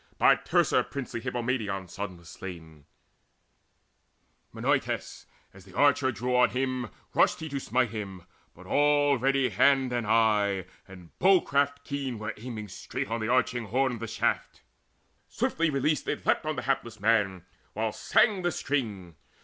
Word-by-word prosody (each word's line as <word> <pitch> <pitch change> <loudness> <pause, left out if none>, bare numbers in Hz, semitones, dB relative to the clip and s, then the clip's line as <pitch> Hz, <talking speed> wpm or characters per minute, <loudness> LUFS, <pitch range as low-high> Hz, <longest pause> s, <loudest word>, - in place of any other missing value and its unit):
By - - +6
Teucer - - +2
princely 125 -4 -5
Hippomedon's 115 -7 -3
son 100 -2 -5
was 85 -1 -17
slain, 80 -5 -10 1.7
Menoetes: - - -2 0.3
as 95 - -15
the 95 -1 -16
archer 140 -2 +4
drew 125 +3 -2
on 125 0 +5
him, 130 -2 -2 0.2
Rushed - - +3
he 160 - -5
to 140 -1 -3
smite 125 -2 0
him; 100 -5 -6 0.3
but 95 - -14
already 140 0 +3
hand 130 +4 +3
And 120 -3 -1
eye, 105 -4 +2 0.2
and 90 -3 -13
bow 190 0 +6
craft 140 0 0
keen 140 -4 -4
were 110 0 -4
aiming 110 -2 -7
straight 95 - -5
On 115 0 -1
the 110 - -1
arching 125 -1 +1
horn 125 +2 0
the 115 - -5
shaft. 115 +1 -2 0.6
Swiftly 165 0 0
released 145 +2 0
It - - -3
leapt - - +1
on 155 - -1
the - - -4
hapless 120 -5 -2
man, 100 -4 +1 0.3
while 110 +1 -1
sang 200 - +2
the 175 0 0
string. 105 - -3
120 Hz, 150 wpm, -28 LUFS, 100-135 Hz, 1.7 s, By